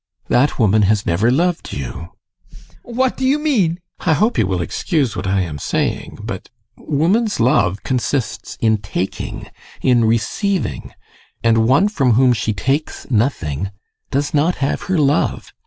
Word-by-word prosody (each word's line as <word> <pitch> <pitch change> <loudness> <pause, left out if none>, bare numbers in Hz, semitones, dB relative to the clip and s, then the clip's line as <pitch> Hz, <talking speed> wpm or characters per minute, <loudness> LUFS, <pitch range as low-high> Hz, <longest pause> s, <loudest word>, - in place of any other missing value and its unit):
That 135 +4 +2
woman 110 -2 +3
has 105 -1 +1
never 95 +8 +2
loved 170 +6 0
you. 70 +5 -6 0.4
ADOLPH. - - -17 0.2
What 250 +2 -1
do 265 - -4
you 265 +3 +3
mean? 255 - +1 0.3
GUSTAV. - - -9
I - - +6
hope 215 +9 +1
you 100 - +2
will 95 -2 -1
excuse 145 - -1
what - - -3
I 95 0 +2
am 80 -5 -4
saying - - -2
but - - -6 0.3
woman's 190 +10 0
love 105 -5 +2
consists 130 0 -2
in 110 -1 +2
taking, 100 -2 -4 0.4
in 120 -3 +4
receiving, 115 - -1 0.5
and 115 -1 +3
one 140 - +4
from 140 - +2
whom 125 +2 +4
she 110 -1 -1
takes 135 - -2
nothing 100 - 0 0.4
does 140 +1 -1
not 155 +4 +2
have 140 +1 -1
her 185 - +2
love. 145 0 +1
130 Hz, 155 wpm, -19 LUFS, 105-165 Hz, 0.5 s, I